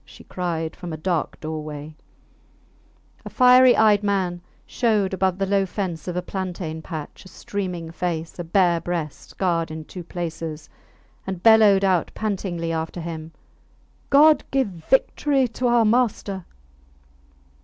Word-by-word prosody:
she - - -15
cried 165 -3 -3
from 175 -3 -7
a 155 - -5
dark 170 0 -2
doorway; 155 -1 -6 1.3
a - - -7
fiery 250 0 +6
eyed 210 -2 +5
man 190 -4 -1 0.2
showed 210 -6 0
above 190 -1 0
the 195 - 0
low 195 0 +2
fence 180 -4 -4
of 180 - -3
a 180 - -2
plantain 180 -4 -5
patch 155 -2 -8
a - - -14
streaming 180 -3 -5
face, 165 0 -4
a - - -2
bare 175 0 +2
breast 165 -4 -4
scarred 170 -3 -1
in 155 0 -7
two 180 +2 -9
places, 165 -3 -6 0.6
and 190 -2 -5
bellowed 215 -3 +6
out 185 -3 +2
pantingly 185 -6 -3
after 160 +1 -3
him, 160 -1 -6 0.8
God 300 +1 +6
give 265 -5 +1
victory 265 - +1
to 245 +3 -2
our 240 -1 +4
master! 215 -5 0
180 Hz, 140 wpm, -23 LUFS, 165-205 Hz, 1.3 s, fiery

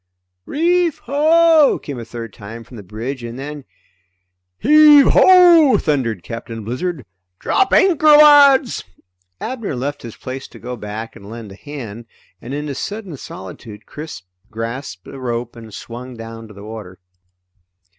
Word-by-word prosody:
_" - - -57 0.4
"Reef 340 +1 +1
ho!" 315 +2 +4
came 140 -4 -8
a 115 - -7
third 115 -2 -8
time 115 +3 -10
from 125 - -15
the 110 - -9
bridge, 115 +7 -6
and 120 +1 -7
then 145 +1 -7 0.9
"Heave 295 +1 +6
ho!" 345 -6 +6
thundered 120 - -1
Captain 115 +2 -7
Blizzard. 135 - -4 0.3
"Drop 390 - +1
anchor, 335 -5 +3
lads!" 290 -3 +6 0.6
Abner 230 - -5
left 140 +3 -4
his 115 -2 -9
place 130 +1 -7
to - - -15
go 125 +1 -7
back 110 0 -7
and 100 0 -13
lend 115 -2 -9
a - - -11
hand, 120 -4 -9 0.3
and 120 - -9
in 145 +2 -4
his 140 -3 -5
sudden 205 -6 -6
solitude 105 -1 -11
Chris 150 - -9 0.3
grasped 115 -3 -6
a 135 - -10
rope 120 -1 -4
and 115 -2 -12
swung 120 +3 -9
down 115 0 -9
to 105 - -14
the 100 - -12
water. 105 -4 -9
130 Hz, 155 wpm, -18 LUFS, -, 0.9 s, Heave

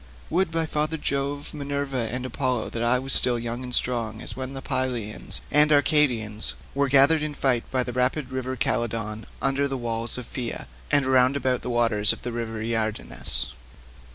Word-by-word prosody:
Would, 185 +2 +2
by 165 0 0
father 155 +1 -1
Jove, 140 0 -2
Minerva, 140 -5 -3
and 125 +1 -3
Apollo, 130 -2 -2
that 115 - -4
I 120 +2 +3
were 130 +2 -6
still 125 -2 +3
young 120 +1 -4
and 125 -1 -7
strong 115 -3 +3
as - - -7
when 130 +1 -6
the 135 - -6
Pylians 125 -5 +1
and 150 +1 +6
Arcadians 125 -8 +2 0.2
were 140 0 +1
gathered 140 +4 +5
in 150 -1 -1
fight 125 -4 0
by 130 -1 +1
the 125 - -6
rapid 125 +2 0
river 130 0 -3
Celadon 110 -1 -1 0.2
under 140 +1 +2
the 135 -1 -3
walls 115 -1 -3
of 125 - -6
Pheia, 120 -1 -5 0.2
and 140 -2 +4
round 130 0 +4
about 130 -2 0
the - - -5
waters 115 -3 +2
of - - -12
the 120 - -3
river 115 -2 -4
Iardanus. 110 - -2
125 Hz, 180 wpm, -25 LUFS, 115-140 Hz, 0.2 s, and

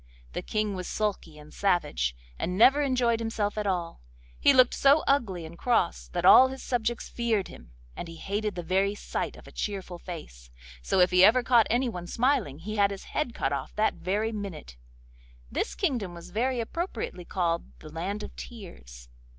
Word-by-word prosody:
The - - -3
King 215 -1 -1
was 185 -2 -5
sulky 200 -7 -3
and 150 0 -14
savage, 65 - 0 0.2
and 180 +2 -2
never 270 +7 +6
enjoyed 250 -4 +1
himself 225 -2 -2
at 210 -1 -2
all. 175 - -2 0.4
He - - +6
looked 255 -2 +5
so 280 +3 +4
ugly 205 -12 +1
and 160 +1 -10
cross 115 - 0
that - - -3
all 260 - +9
his 265 0 -8
subjects 240 -1 -1
feared 225 -5 -1
him, - - -14 0.2
and - - -6
he 165 - -9
hated 205 +5 -3
the 175 - -4
very 195 +4 +1
sight - - -4
of - - -14
a - - -13
cheerful 190 -4 -4
face; 60 - -9 0.3
so 120 - +2
if 180 - +4
he 180 0 +6
ever 240 +5 +6
caught 235 -2 +4
anyone 230 -7 -1
smiling 230 - +1
he 210 +7 -6
had 200 -1 +4
his 200 -1 -7
head 250 -6 -1
cut 135 - -1
off 135 -2 -5
that 215 +1 +2
very 210 +4 -1
minute. 195 - -7 0.8
This - - -2
kingdom 240 - -1
was 170 +1 -11
very 245 +5 0
appropriately 230 - -4
called 170 -1 -1
the 155 - -12
Land 190 +6 -4
of - - -9
Tears. 60 - -11
200 Hz, 185 wpm, -28 LUFS, 170-235 Hz, 0.8 s, all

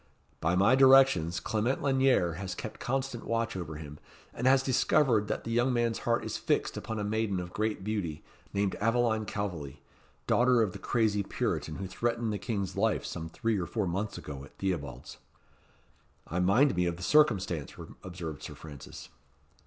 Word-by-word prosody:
"By 80 +2 +1
my 100 +7 +5
directions 130 -11 +6
Clement 115 +3 0
Lanyere 130 - +3
has 95 -2 -4
kept 110 - -7
constant 130 -2 -2
watch 115 -2 -1
over 85 -4 -5
him, 75 -1 -9 0.3
and 125 - -1
has 135 0 +5
discovered 130 -4 +3
that - - -3
the 115 - -5
young 120 +3 +2
man's 120 -2 0
heart 120 0 0
is - - -3
fixed - - 0
upon 110 - -5
a 105 - -2
maiden 105 -2 0
of 90 0 -7
great 105 -2 -1
beauty, 95 -7 -3 0.3
named 100 -1 0
Aveline 115 -1 +1
Calveley, 90 -9 -4 0.5
daughter 125 -1 +4
of 105 - -1
the - - -8
crazy 110 -3 +1
Puritan 80 -5 -2
who 95 - -5
threatened 115 +4 -1
the 100 - -3
King's 100 -2 -3
life - - +1
some 80 0 -5
three 110 +4 -1
or 85 - -3
four 110 -3 -1
months 95 +4 -2
ago 70 -2 -7
at 70 - -15
Theobalds." 85 -9 -4 1.1
"I 85 - -3
mind 100 +8 +4
me 90 0 +1
of 85 -1 -2
the 90 - -8
circumstance," 95 - +2 0.3
observed 85 -5 -7
Sir - - -8
Francis. 75 -4 -10
105 Hz, 175 wpm, -30 LUFS, 90-120 Hz, 1.1 s, directions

